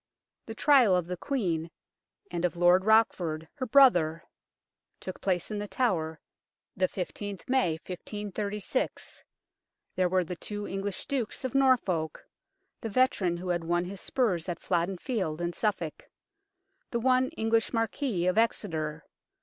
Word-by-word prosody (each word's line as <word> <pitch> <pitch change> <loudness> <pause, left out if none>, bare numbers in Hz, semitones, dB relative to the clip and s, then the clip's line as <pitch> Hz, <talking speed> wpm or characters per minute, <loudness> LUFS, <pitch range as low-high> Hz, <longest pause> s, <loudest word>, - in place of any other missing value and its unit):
The - - -6
trial 260 -10 +5
of 180 -2 +1
the 180 +1 -4
Queen 175 - -2 0.6
and 170 - -3
of 180 0 +1
Lord 175 +2 +4
Rochford, 175 -8 +2
her 255 -3 -4
brother, 175 - +5 0.8
took 185 - -7
place 180 0 0
in 210 - -2
The 205 - -4
Tower, 165 -11 0 0.6
the 185 0 +2
i5th 195 +1 -6
May 255 -10 +2
1536. 205 +4 -4 0.7
There 185 -1 +2
were 185 0 +2
the 180 +1 -5
two 205 +2 -5
English 195 0 -4
Dukes, 260 -1 -2
of 255 - -3
Norfolk 235 - +2 0.6
the 225 - -3
veteran 200 -7 +2
who 180 +1 -5
had 175 -1 0
won 175 +1 0
his 190 +1 -7
spurs 190 -10 0
at 175 - -3
Flodden 180 +1 0
Field 185 - -2
and 175 0 -2
Suffolk. 195 -8 -2 0.8
The 235 - -1
one 255 +1 +3
English 225 0 +1
Marquis, 225 -4 -1
of 185 +4 +3
Exeter. 160 -9 -1
190 Hz, 140 wpm, -29 LUFS, 175-225 Hz, 0.8 s, trial